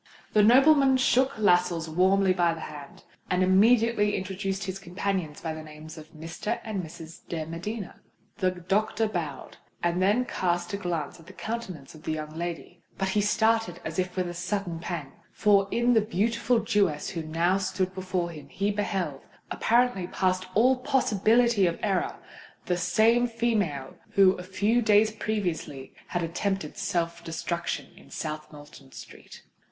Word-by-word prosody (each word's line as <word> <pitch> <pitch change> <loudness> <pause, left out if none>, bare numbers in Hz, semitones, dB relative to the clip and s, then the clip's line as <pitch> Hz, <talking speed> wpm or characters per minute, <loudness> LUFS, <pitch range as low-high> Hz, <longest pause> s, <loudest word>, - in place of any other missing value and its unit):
The 215 - +6
nobleman 270 +4 +6
shook 260 0 +2
Lascelles 175 -5 +2
warmly 185 +3 +3
by 175 -2 +2
the 165 - -9
hand, 145 -2 -9 0.3
and 180 0 +2
immediately 210 +2 +4
introduced 195 +1 -3
his 190 0 -4
companions 185 -4 -3
by 160 -1 -3
the 155 - -7
names 155 +1 -11
of 155 -1 -12
Mr. 165 +6 -4
and 215 -4 -3
Miss 165 0 -10
de 160 -2 -3
Medina. 180 +5 -6 0.4
The 185 -5 +2
doctor 195 +5 0
bowed, 160 -9 -5 0.3
and 175 +1 +1
then 210 +7 +3
cast 175 -4 -1
a - - 0
glance 175 -5 -3
at 165 - -17
the 190 - -12
countenance 190 -11 -6
of 155 - -13
the 160 - -2
young 155 0 -6
lady: 175 +1 -6 0.2
but 195 -1 -1
he 205 +2 +2
started 220 -3 +1
as 160 +2 -3
if 185 0 -2
with 185 -1 -1
a 175 - -5
sudden 180 -1 -3
pang,—for 180 +5 0
in 240 +3 +2
the 225 - +5
beautiful 230 +3 +1
Jewess 205 -9 +1
who 170 - -3
now 165 +4 +1
stood 185 -1 -1
before 185 -2 -2
him, 150 -3 -11
he 200 +1 -1
beheld—apparently 200 - -1
past 185 0 0
all 250 +5 +5
possibility 235 -4 +3
of 170 - -1
error—the 185 -2 -3
same 220 +7 +3
female 210 - -1 0.2
who 195 -1 +6
a 180 - -5
few 200 +6 +1
days 215 -1 +4
previously 180 -11 -3
had 175 -1 -2
attempted 195 +4 -2
self 170 -4 -2
destruction 170 +1 -3
in - - -17
South 155 -1 -5
Moulton 145 -2 -14
Street. - - -12
185 Hz, 155 wpm, -27 LUFS, 170-215 Hz, 0.4 s, The